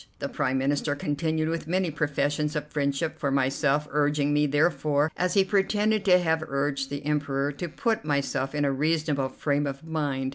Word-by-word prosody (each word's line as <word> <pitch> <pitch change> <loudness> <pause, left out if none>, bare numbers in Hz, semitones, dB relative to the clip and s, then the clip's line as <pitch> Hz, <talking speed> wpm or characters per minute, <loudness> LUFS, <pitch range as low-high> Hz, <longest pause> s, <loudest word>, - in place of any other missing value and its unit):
The - - -3
Prime 130 +1 0
Minister 145 +2 0
continued 155 +2 -1
with 165 -1 -3
many 180 0 0
professions 150 0 -1
of 150 - -2
friendship 145 +2 -1
for 140 - 0
myself, 140 +2 +1
urging 145 0 +1
me 150 0 +3
therefore, 150 0 +1
as 180 +2 0
he 195 - +6
pretended 205 +2 +1
to 180 -2 +6
have 160 -3 +1
urged 140 0 -1
the 145 0 -5
Emperor, 145 -2 0
to 155 +5 -5
put 225 - -1
myself 140 -1 -1
in 145 -1 +1
a 140 - +2
reasonable 150 -1 0
frame 145 +2 -1
of 135 +1 -6
mind. 145 -5 -2
150 Hz, 180 wpm, -26 LUFS, 140-160 Hz, -, he